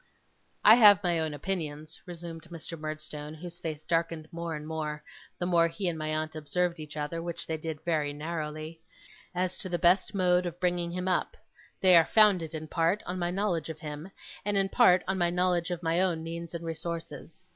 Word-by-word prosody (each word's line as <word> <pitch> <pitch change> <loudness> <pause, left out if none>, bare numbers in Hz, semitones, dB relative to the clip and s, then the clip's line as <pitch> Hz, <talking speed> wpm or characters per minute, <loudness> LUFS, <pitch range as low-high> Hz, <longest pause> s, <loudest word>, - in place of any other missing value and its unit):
'I 220 - +10
have 205 -3 +8
my 175 -2 +1
own 160 -1 -1
opinions,' 155 -1 -4
resumed 170 -2 -7
Mr. 165 0 -7
Murdstone, 155 -1 -6
whose 175 +2 -8
face 155 -2 -5
darkened 165 -1 -1
more 170 -1 -4
and 150 0 -7
more, 155 -1 -4 0.3
the 175 - -2
more 170 -2 +4
he 180 +3 -3
and 170 - 0
my 155 -1 -4
aunt 155 +1 -2
observed 170 +3 -1
each 155 0 -8
other, 150 +3 -3
which 170 0 -5
they 160 - -2
did 160 -1 -6
very 155 -4 +1
narrowly, 155 +1 -5 0.5
'as 185 0 0
to 185 - -4
the 175 - 0
best 180 +4 +3
mode 180 -1 +3
of 175 0 -7
bringing 175 -1 0
him 180 +1 -3
up; 185 - 0 0.4
they 185 -2 +7
are 165 - +8
founded, 185 -7 +4
in 155 0 -5
part, 165 +6 +1
on 180 +1 -4
my 175 0 0
knowledge 180 -4 -1
of 160 - -5
him, 150 +3 -7 0.3
and 205 0 0
in 195 0 +2
part 185 -1 +5
on 190 0 0
my 175 -1 +3
knowledge 180 -1 +1
of 175 -1 -4
my 165 +2 +2
own 170 -4 +1
means 170 +1 -6
and 170 0 -5
resources. 165 +1 -6
170 Hz, 200 wpm, -29 LUFS, 155-180 Hz, 0.5 s, I